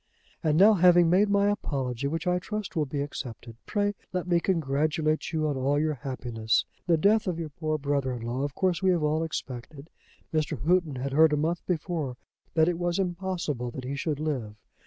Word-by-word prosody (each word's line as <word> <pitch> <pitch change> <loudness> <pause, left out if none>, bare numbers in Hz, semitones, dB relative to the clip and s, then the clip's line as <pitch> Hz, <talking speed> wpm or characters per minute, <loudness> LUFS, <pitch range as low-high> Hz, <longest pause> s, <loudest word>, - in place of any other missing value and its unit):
"And 155 -2 +2
now, 205 +5 +8
having 175 -2 +5
made 200 +3 +4
my 200 0 +3
apology, 135 - -2
which 165 +3 -3
I 180 0 +2
trust 210 +2 -5
will 155 -3 +1
be 140 +1 -3
accepted, 125 -5 -6
pray 205 -1 0 0.2
let 180 -1 -2
me 175 -1 +3
congratulate 155 -2 0
you 155 -1 0
on 145 - -1
all 135 +2 +1
your 155 0 +1
happiness. 120 -5 -1 0.2
The 170 -2 +4
death 215 +6 +3
of 175 -3 -1
your 165 -2 -4
poor 155 +1 -2
brother 140 -2 -1
in 120 -2 -6
law 120 +3 -2
of 145 0 -3
course 185 -3 +1
we 190 - +3
have 175 -4 +2
all 155 +2 +1
expected. 140 -1 -6 0.4
Mr. 155 -3 0
Houghton 170 -4 +2
had 135 +2 -3
heard 155 +1 +5
a - - +2
month 165 +4 -1
before 160 -7 -2 0.4
that 160 -1 +4
it 175 -1 0
was 175 -1 0
impossible 175 -9 -2
that 130 +2 -7
he 130 +2 -4
should 145 0 -2
live. 130 -9 -3
155 Hz, 200 wpm, -27 LUFS, 140-175 Hz, 0.4 s, now